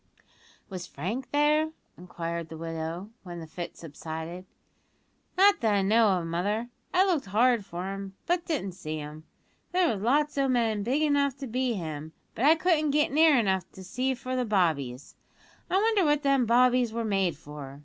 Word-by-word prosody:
"Was 185 -3 -7
Frank 215 - -4
there?" 300 +2 +2 0.2
inquired 170 -2 -5
the 160 - -8
widow, 165 +4 -5
when 175 -2 -8
the 165 - -7
fit 170 +2 -7
subsided. 160 +3 -7 0.9
"Not 400 +2 +5
that 220 -2 +2
I 195 - +2
know 220 +2 +4
of, 170 - -3
mother; 205 +8 -2 0.2
I 370 +1 +4
looked 340 - 0
hard 230 +3 +3
for 185 +1 -5
him, 195 -1 -7
but 350 0 +1
didn't 285 - -2
see 155 -4 -6
him. 150 +1 -8 0.5
There 365 -1 +3
was 195 - -5
lots 290 +5 +1
o' 275 - +2
men 230 -5 +1
big 260 +9 0
enough 285 -2 +2
to 275 - -6
be 250 0 -1
him; 160 -3 -6 0.2
but 245 - -1
I 310 +2 +7
couldn't 320 -2 +2
get 295 0 +2
near 310 0 +5
enough 190 -5 0
to 190 - -10
see 255 +8 -1
for 255 +1 -5
the 255 - +1
bobbies. 155 - 0 0.6
I 375 - +2
wonder 430 -1 +3
what 295 -1 +2
them 275 -4 +3
bobbies 245 0 +4
were 230 0 -3
made 195 -6 0
for!" 145 -3 -10
215 Hz, 180 wpm, -28 LUFS, 170-280 Hz, 0.9 s, I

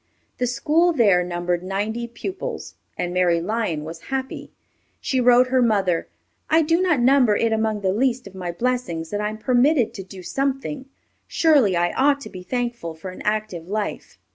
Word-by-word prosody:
The 250 - +1
school 325 +8 +2
there 200 - +4
numbered 175 0 -2
ninety 210 +5 -3
pupils, 370 +11 -6 0.2
and 175 0 -2
Mary 180 -2 +2
Lyon 185 -4 -2
was 165 +1 -9
happy. 265 -1 -4 0.5
She 260 -2 0
wrote 250 +1 +5
her 260 0 +3
mother, 195 -7 +1 0.4
"I 320 +1 +4
do 330 +3 +2
not 350 -7 +2
number 250 -3 +4
it 225 +1 +1
among 220 -1 0
the 190 -1 +1
least 250 +2 0
of 195 - -11
my 180 -2 -4
blessings 175 -6 -2
that 205 - -2
I 210 - -1
am 215 - -7
permitted 250 +2 +2
to 195 - -7
do 185 0 -11
something. 270 +3 -3 0.4
Surely 285 - +3
I 175 0 +1
ought 280 +1 +3
to - - -9
be 185 - -8
thankful 235 -4 -3
for 185 +4 -8
an 185 - -11
active 210 -6 -2
life." 210 +1 -4
220 Hz, 180 wpm, -22 LUFS, 185-260 Hz, 0.5 s, wrote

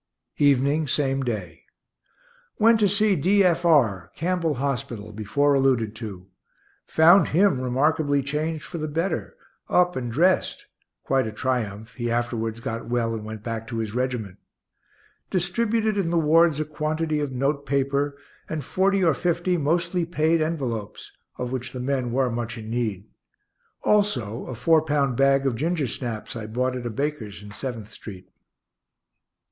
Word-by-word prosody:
Evening, 145 +2 +3
same 135 0 0
day. 100 -10 -4 0.9
Went 225 +1 +5
to 205 -2 +4
see 205 0 +3
D. 195 +6 +3
F. 175 -1 +2
R., 115 - +3
Campbell 170 -2 0
hospital, 120 -5 -3
before 140 +8 +1
alluded 130 -6 +2
to; 100 -6 -7 0.6
found 170 +5 +6
him 170 -5 +3
remarkably 145 +2 +1
changed 150 +3 -2
for 170 - -6
the 155 - -2
better 165 +6 -2 0.3
up 180 0 +3
and 120 -2 -3
dressed 175 +9 +1 0.4
(quite 135 -3 +1
a - - -4
triumph; 110 -1 -3
he 120 -1 -3
afterwards 115 -1 -1
got 115 0 -5
well 120 -1 0
and 110 -1 -5
went 110 -1 -7
back 115 -1 -4
to 115 - -4
his 110 -2 -3
regiment). 125 -6 -2 0.9
Distributed 215 +4 0
in 175 -4 0
the 170 - +1
wards 160 0 +4
a 155 - -1
quantity 155 +1 -2
of 145 -2 -2
note 140 +2 -1
paper 140 +1 0 0.3
and 155 -2 -3
forty 190 +6 +1
or 165 -3 +4
fifty, 175 +5 0
mostly 170 +3 0
paid, 165 -1 +1
envelopes, 125 -10 -3 0.3
of 125 -1 -4
which 130 -1 -4
the 130 - -5
men 130 -1 -1
were 130 0 +1
much 120 0 -4
in 110 0 -7
need; 110 -5 -2 0.8
also 130 - +1
a 130 - -5
four 160 +7 +4
pound 145 -4 0
bag 135 +1 +3
of 135 - +2
gingersnaps 130 -6 -3
I 110 -2 -5
bought 125 +3 -1
at 120 -1 -4
a - - -2
baker's 115 -5 -4
in 105 - -10
Seventh 110 -2 -6
street. 95 -5 -11
135 Hz, 155 wpm, -24 LUFS, 115-160 Hz, 0.9 s, found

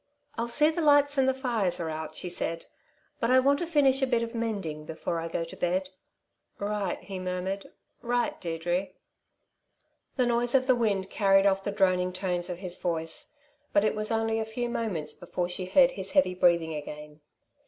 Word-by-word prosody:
"I'll 230 0 -2
see 300 +6 +5
the 335 - -2
lights 290 -2 +4
and 265 0 +4
the - - +2
fires 225 -9 +1
are 170 - -2
out," 155 0 -6
she - - -5
said, 165 -1 -2 0.5
"but 230 - 0
I 255 +1 +6
want 280 +2 +3
to 345 - -2
finish 280 -4 +3
a 265 - +2
bit 240 -2 +1
of 230 0 -5
mending 200 -10 -3
before 160 +2 -4
I 165 - -4
go 165 0 -2
to 165 - -9
bed." 185 +2 -1 0.7
"Right," 205 -2 -2
he 195 -2 -6
murmured. 185 +2 -3 0.3
"Right, 245 +6 -1
Deirdre!" 175 +2 -1 1.3
The 255 - +2
noise 240 +1 +1
of 260 -1 +4
the 260 - +5
wind 200 -5 0
carried 195 -2 +4
off 195 -1 +2
the 200 - -2
droning 185 -2 +2
tones 180 -1 -2
of 175 - -4
his 180 -1 -5
voice; 165 - -3 0.4
but 200 - +4
it 215 - +2
was 215 0 -3
only 225 0 0
a - - 0
few 240 +2 -4
moments 180 -11 -3
before 175 0 -3
she 180 +1 -4
heard 260 +8 +5
his 190 -5 -5
heavy 275 -11 +4
breathing 170 -3 +2
again. 150 0 -8
195 Hz, 195 wpm, -28 LUFS, 175-240 Hz, 1.3 s, I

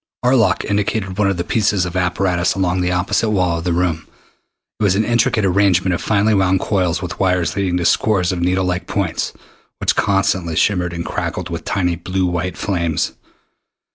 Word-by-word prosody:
Arlok 125 -3 +3
indicated 100 -1 -1
one 100 -2 +3
of 95 - -1
the 85 - -1
pieces 105 -1 +1
of 90 0 -6
apparatus 90 0 0
along 90 -1 0
the 90 0 0
opposite 90 +5 0
wall 90 -5 +1
of - - -6
the 90 - +1
room. 85 -2 -1 0.7
It - - -1
was 95 -2 +3
an 110 +2 +1
intricate 120 -2 +2
arrangement 95 -1 +2
of 85 - -2
finely 105 0 +2
wound 95 -1 +2
coils 90 -4 0
with 90 - -6
wires 90 -5 +1
leading 95 -2 0
to 85 - -2
scores 95 -1 +2
of 90 -2 -3
needle 90 +2 +1
like 90 0 -2
points 100 -6 -2 0.5
which - - 0
constantly 95 -4 +1
shimmered 90 -1 +1
and 85 0 -4
crackled - - -4
with - - -5
tiny 90 -3 0
blue 95 +2 -2
white 90 0 -2
flames. 85 -6 -1
90 Hz, 185 wpm, -18 LUFS, 90-100 Hz, 0.7 s, Arlok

